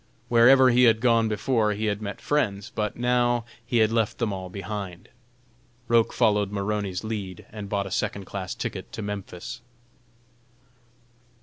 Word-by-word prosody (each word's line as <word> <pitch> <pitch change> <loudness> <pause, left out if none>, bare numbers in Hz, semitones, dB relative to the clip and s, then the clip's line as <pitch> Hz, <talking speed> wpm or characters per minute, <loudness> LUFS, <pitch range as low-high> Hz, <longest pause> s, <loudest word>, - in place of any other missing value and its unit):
Wherever 125 +2 +7
he 125 +1 +5
had 110 -1 +5
gone 115 -2 +3
before, 110 0 +1
he 105 +2 -3
had 105 0 -1
met 100 -1 -5
friends, 105 -9 -1
but 105 -1 -2
now 120 -1 +1 0.2
he 120 0 -1
had 110 -1 +4
left 115 -2 0
them 115 -4 -1
all 95 -1 -6
behind. 95 -1 -6 0.8
Roch 115 -1 +3
followed 105 -4 +2
Maroney's 100 -2 -2
lead 100 -5 -5
and 105 -2 -7
bought 100 -1 -1
a 95 - -7
second 100 +1 -2
class 100 +3 -5
ticket 110 -6 -5
to 110 - -5
Memphis. 100 +1 -6
105 Hz, 150 wpm, -25 LUFS, 100-115 Hz, 0.8 s, Wherever